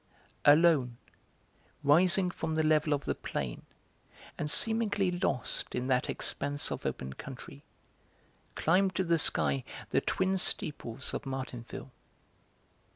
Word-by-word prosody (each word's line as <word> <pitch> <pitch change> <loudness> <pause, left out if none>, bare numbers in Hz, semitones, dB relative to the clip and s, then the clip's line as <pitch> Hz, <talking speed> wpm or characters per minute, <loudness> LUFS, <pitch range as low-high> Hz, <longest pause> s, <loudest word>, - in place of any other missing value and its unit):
Alone, 145 -5 +5 0.9
rising 180 +5 +4
from 160 -2 -3
the 160 - +2
level 155 0 +3
of 145 -1 0
the - - 0
plain, 65 -4 -4 0.7
and 150 - -3
seemingly 210 0 +2
lost 175 - -2
in 125 - -1
that 130 -1 +1
expanse 145 0 -2
of - - -3
open 65 0 -4
country, 70 - -10 0.9
climbed 185 +3 +2
to 190 - +1
the 170 -2 +2
sky 70 - +2 0.3
the - - +3
twin 190 0 0
steeples 140 -7 -2
of 140 - -4
Martinville. 130 -3 -6
150 Hz, 120 wpm, -31 LUFS, 130-180 Hz, 0.9 s, Alone